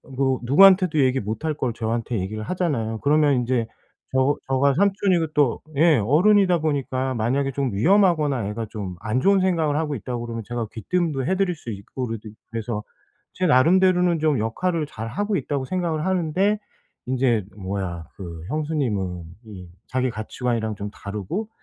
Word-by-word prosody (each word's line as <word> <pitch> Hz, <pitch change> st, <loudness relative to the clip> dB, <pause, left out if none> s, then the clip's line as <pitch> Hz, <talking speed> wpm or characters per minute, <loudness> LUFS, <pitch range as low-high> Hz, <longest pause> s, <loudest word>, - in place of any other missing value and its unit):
뭐 130 Hz, -1 st, +1 dB
누구한테도 180 Hz, +4 st, +6 dB
얘기 130 Hz, -1 st, +3 dB
못할 110 Hz, +9 st, -3 dB
걸 130 Hz, -5 st, -2 dB
저한테 115 Hz, 0 st, -2 dB
얘기를 105 Hz, +4 st, -4 dB
하잖아요. 115 Hz, -8 st, -2 dB
그러면 150 Hz, 0 st, +3 dB
인제 120 Hz, -2 st, 0 dB, 0.5 s
저 130 Hz, +2 st, +2 dB
저가 135 Hz, +1 st, +2 dB
삼촌이고 190 Hz, -2 st, +2 dB
또 145 Hz, -5 st, +2 dB, 0.2 s
예 160 Hz, -1 st, +5 dB
어른이다 180 Hz, -, +4 dB
보니까 135 Hz, -4 st, -1 dB
만약에 130 Hz, +5 st, 0 dB
좀 135 Hz, -4 st, -2 dB
위험하거나 150 Hz, -, +3 dB
애가 110 Hz, +1 st, -4 dB
좀 100 Hz, -5 st, -5 dB
안 110 Hz, +3 st, 0 dB
좋은 195 Hz, +4 st, +4 dB
생각을 165 Hz, -6 st, +1 dB
하고 155 Hz, -2 st, -1 dB
있다고 120 Hz, +1 st, -5 dB
그러면 115 Hz, -1 st, -5 dB
제가 120 Hz, -1 st, -3 dB
귀띔도 145 Hz, -, -1 dB
해 190 Hz, -, +2 dB
드릴 190 Hz, -2 st, +1 dB
수 150 Hz, -, -10 dB
있고 110 Hz, +5 st, -6 dB
그래도 110 Hz, -1 st, -6 dB, 0.2 s
그래서 115 Hz, -2 st, -3 dB, 0.5 s
제 185 Hz, -, -1 dB
나름대로는 180 Hz, +4 st, +4 dB
좀 150 Hz, -4 st, +2 dB
역할을 160 Hz, +9 st, -1 dB
잘 115 Hz, -5 st, -6 dB
하고 205 Hz, -, -1 dB
있다고 140 Hz, -5 st, -2 dB
생각을 165 Hz, -1 st, -2 dB
하는데 190 Hz, +3 st, +1 dB, 0.5 s
인제 125 Hz, -5 st, +1 dB
뭐야 95 Hz, -4 st, -4 dB
그 85 Hz, -4 st, -8 dB
형수님은 120 Hz, -, -2 dB, 0.2 s
이 95 Hz, -5 st, -10 dB, 0.2 s
자기 130 Hz, 0 st, 0 dB
가치관이랑 110 Hz, 0 st, -3 dB
좀 100 Hz, 0 st, -6 dB
다르고. 105 Hz, -, -5 dB
130 Hz, 355 characters per minute, -23 LUFS, 110-165 Hz, 0.5 s, 누구한테도